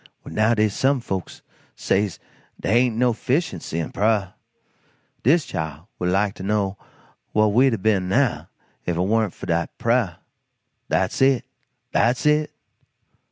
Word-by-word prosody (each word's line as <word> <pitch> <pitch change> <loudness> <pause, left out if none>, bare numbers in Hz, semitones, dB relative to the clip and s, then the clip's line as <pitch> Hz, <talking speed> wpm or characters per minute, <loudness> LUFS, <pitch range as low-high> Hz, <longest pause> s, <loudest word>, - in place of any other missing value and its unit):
Well - - -9
now 110 +2 +3
dey's 105 -2 +2
some 135 +4 +2
folks 95 -6 -5 0.3
says 100 -3 0 0.4
dey 105 - 0
ain't 120 -3 +1
no 125 0 +3
'ficiency 125 - -2
in 80 - -3
prah. 105 -2 +1 0.9
Dis 150 +4 +3
Chile 80 -7 -4 0.2
would 90 - 0
like 100 +2 +1
to - - -8
know 100 -1 0 0.6
whah 110 0 +4
we'd 120 +4 +4
a - - -5
ben 95 -2 +1
now 130 +5 +1 0.3
if 85 -1 -2
it - - -1
warn't 105 +2 +1
fo' - - -8
dat 85 -1 0
prah? 115 -7 +1 0.7
Dat's - - 0
it. 135 -3 +4 0.5
Dat's 120 +4 +2
it!" 150 0 +3
110 Hz, 150 wpm, -23 LUFS, 95-125 Hz, 0.9 s, whah